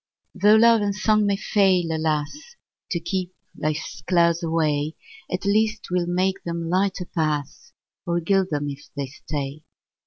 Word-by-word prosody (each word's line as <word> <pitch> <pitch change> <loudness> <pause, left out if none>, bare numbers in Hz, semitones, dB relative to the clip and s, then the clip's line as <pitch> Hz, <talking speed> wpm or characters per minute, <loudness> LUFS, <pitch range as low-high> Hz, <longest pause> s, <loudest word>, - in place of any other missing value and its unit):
Tho' 205 +2 +5
love 230 0 +6
and 200 -1 0
song 215 0 +2
may 200 - +2
fail, 190 -5 +2
alas! 160 - -2 0.3
To 170 - -1
keep 180 +1 -3 0.2
life's 155 -2 -3
clouds 170 -1 +3
away, 155 -2 0 0.4
At 185 +2 -3
least 215 +2 +2
'twill 180 -4 -1
make 185 +2 0
them 170 -1 -3
lighter 190 0 0
pass, 155 -5 -3 0.4
Or 170 0 +1
gild 190 +2 +1
them 145 -1 -2
if 145 0 -8
they 140 - -1
stay. 140 +1 -6
175 Hz, 150 wpm, -23 LUFS, 155-200 Hz, 0.4 s, love